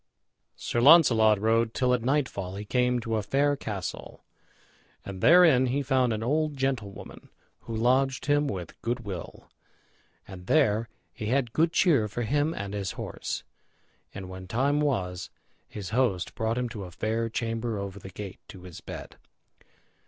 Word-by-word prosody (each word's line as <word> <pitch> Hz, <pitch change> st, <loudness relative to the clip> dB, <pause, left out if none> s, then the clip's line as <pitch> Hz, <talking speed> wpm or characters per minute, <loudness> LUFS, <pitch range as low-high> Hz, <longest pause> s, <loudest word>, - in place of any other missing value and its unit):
Sir 120 Hz, -, -2 dB
Launcelot 120 Hz, -, +6 dB
rode 115 Hz, +1 st, +1 dB
till 125 Hz, -1 st, +2 dB
at 125 Hz, -, +1 dB
nightfall 120 Hz, -8 st, -1 dB
he 105 Hz, +1 st, -6 dB
came 125 Hz, +2 st, +1 dB
to 115 Hz, -1 st, -2 dB
a -, -, 0 dB
fair 140 Hz, +7 st, +1 dB
castle, 100 Hz, -9 st, -6 dB, 0.8 s
and 95 Hz, -2 st, -7 dB
therein 160 Hz, -7 st, +6 dB
he 140 Hz, +3 st, 0 dB
found 130 Hz, -2 st, +2 dB
an 110 Hz, 0 st, -2 dB
old 150 Hz, +3 st, 0 dB
gentlewoman, 130 Hz, -7 st, -4 dB, 0.3 s
who 115 Hz, -, -7 dB
lodged 130 Hz, +4 st, +1 dB
him 145 Hz, 0 st, +2 dB
with 90 Hz, -8 st, -6 dB
good 120 Hz, +1 st, -2 dB
will, 100 Hz, -6 st, -8 dB, 0.8 s
and 90 Hz, -2 st, -11 dB
there 115 Hz, -7 st, +2 dB, 0.2 s
he 110 Hz, -, -5 dB
had 120 Hz, -1 st, 0 dB
good 165 Hz, +1 st, +2 dB
cheer 150 Hz, -, +3 dB
for 120 Hz, +3 st, -4 dB
him 145 Hz, +6 st, +1 dB
and 100 Hz, -10 st, -5 dB
his 100 Hz, -2 st, -3 dB
horse. -, -, -5 dB, 0.7 s
And 95 Hz, -1 st, -8 dB
when 95 Hz, 0 st, -9 dB
time 135 Hz, +8 st, +1 dB
was, 95 Hz, -11 st, -1 dB, 0.4 s
his 100 Hz, -2 st, -7 dB
host 110 Hz, -7 st, 0 dB
brought 115 Hz, -1 st, -1 dB
him 125 Hz, 0 st, -1 dB
to 105 Hz, -5 st, -7 dB
a -, -, -9 dB
fair 110 Hz, +5 st, -2 dB
chamber 115 Hz, 0 st, -2 dB
over 100 Hz, 0 st, -6 dB
the 95 Hz, -, -10 dB
gate 95 Hz, +1 st, -8 dB
to 90 Hz, -2 st, -12 dB
his 90 Hz, -2 st, -10 dB
bed. -, -, -9 dB
115 Hz, 160 wpm, -27 LUFS, 100-135 Hz, 0.8 s, Launcelot